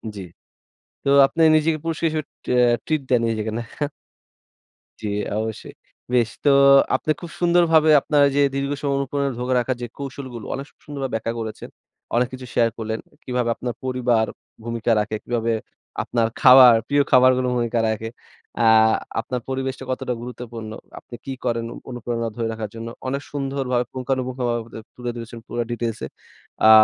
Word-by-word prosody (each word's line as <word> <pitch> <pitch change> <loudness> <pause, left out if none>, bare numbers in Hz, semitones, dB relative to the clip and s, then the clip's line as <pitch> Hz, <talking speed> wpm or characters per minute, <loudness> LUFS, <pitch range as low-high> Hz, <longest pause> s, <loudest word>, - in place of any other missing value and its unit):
জি। 100 - -6 0.8
তো 140 - 0 0.2
আপনি 165 +4 -2
নিজেকে 155 0 +2
পুরস্কার 165 0 -1
হিসেবে 155 -1 -3 0.3
আ - - +5 0.3
ট্রিট 155 -2 0
দেন 125 -2 +3
নিজেকে, 110 -1 -2
নাহ? 115 -1 -6 1.3
জি, 105 - -3 0.3
অবশ্যই। 110 0 -4 0.4
বেশ। 120 -2 +3 0.2
তো - - +6 0.5
আপনি 155 - 0
খুব 170 - -7
সুন্দরভাবে 170 -2 +4
আপনার 145 0 +2
এইযে 140 +1 +1
দীর্ঘ 140 0 -1
সময় 140 -1 0
অনুপ্রেরণা 140 0 -1
ধরে 125 +1 -1
রাখার 125 +2 -1
যে 120 - -3
কৌশলগুলো 130 -4 -7
অনেক 135 - -5
সু - - -31
সুন্দরভাবে 140 -4 -5
ব্যাখ্যা 115 +1 -2
করেছেন। 110 -1 -6 0.5
অনেক 120 +1 +3
কিছু 130 0 -7
শেয়ার 115 -1 +3
করলেন। 110 0 -3 0.2
কিভাবে 125 -2 -1
আপনার 120 -2 -4
পরিবার 125 -3 +1 0.4
ভূমিকা 115 0 -1
রাখে, 105 +1 -2
কিভাবে 115 -1 -1 0.5
আপনার 115 -2 +1
খাওয়ার, 125 -2 +9
প্রিয় 145 0 +3
খাবারগুলো 130 0 +5
ভূমিকা 120 -1 0
রাখে। 110 +1 -3 0.5
আ - - +4 0.5
আপনার 125 +2 -3
পরিবেশটা 130 0 -3
কতটা 125 -1 -2
গুরুত্বপূর্ণ? 120 -2 -7 0.3
আপনি - - -11
কি 135 - -4
করেন 115 -1 0
অ - - -10
অনুপ্রেরণা 120 -1 -3
ধরে 115 -1 -2
রাখার 110 -2 -5
জন্য। 115 0 -6 0.2
অনেক 140 +2 -2
সুন্দরভাবে 135 -3 -1
পুঙ্খানুপুঙ্খভাবে 125 -2 -2
বা 115 - -16
দে - - -6 0.2
তুলে 125 -1 -4
ধরেছেন 115 0 -8
পুরা 120 - -2
ডিটেইলসে। 115 -2 -3 0.6
আ - - +8
125 Hz, 160 wpm, -22 LUFS, 115-135 Hz, 1.3 s, খাওয়ার